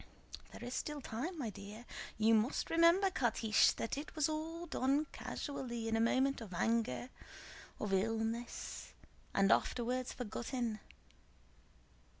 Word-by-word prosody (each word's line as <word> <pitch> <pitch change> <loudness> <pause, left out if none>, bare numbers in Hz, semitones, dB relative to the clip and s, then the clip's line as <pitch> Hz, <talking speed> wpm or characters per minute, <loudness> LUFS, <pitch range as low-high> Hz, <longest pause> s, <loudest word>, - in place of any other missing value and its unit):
"There - - -9
is 245 - -4
still 300 +2 -2
time, 280 +8 -4
my 240 -8 -2
dear. 205 +4 -9 0.3
You 220 +1 +5
must 220 +4 +2
remember, 335 +4 +5
Catiche, 225 -7 +4
that 230 +4 -2
it 300 - -8
was 310 -2 +3
all 320 +2 -3
done 285 -1 +1
casually 240 -5 -4
in 225 - +1
a - - +2
moment 260 +3 +2
of 195 -6 -7
anger, 230 - +1 0.7
of 205 -2 -2
illness, 225 +4 -1 0.4
and 195 0 +4
was - - +7
afterwards 250 +1 -2
forgotten. 240 -1 -3
240 Hz, 135 wpm, -36 LUFS, 225-285 Hz, 0.7 s, was